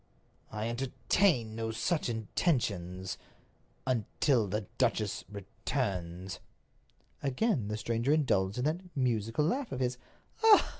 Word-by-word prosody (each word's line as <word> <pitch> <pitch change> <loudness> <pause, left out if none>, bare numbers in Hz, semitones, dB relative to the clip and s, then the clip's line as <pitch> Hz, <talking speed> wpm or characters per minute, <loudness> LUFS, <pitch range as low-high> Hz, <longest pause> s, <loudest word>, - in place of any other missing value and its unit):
"I 105 +1 -2
entertain 125 - +2
no 110 0 -2
such 120 +7 0
intentions—until 110 - -1
the 105 +3 -1 0.2
duchess 115 -5 +1
returns." 95 -3 -3 0.8
Again 135 - +1
the 105 0 -2
stranger 115 +4 0
indulged 105 -10 +2
in 125 - 0
that 160 +4 +1 0.2
musical 120 +1 +1
laugh 255 - 0
of 130 - -3
his. 125 -1 0
115 Hz, 100 wpm, -32 LUFS, 105-135 Hz, 0.8 s, entertain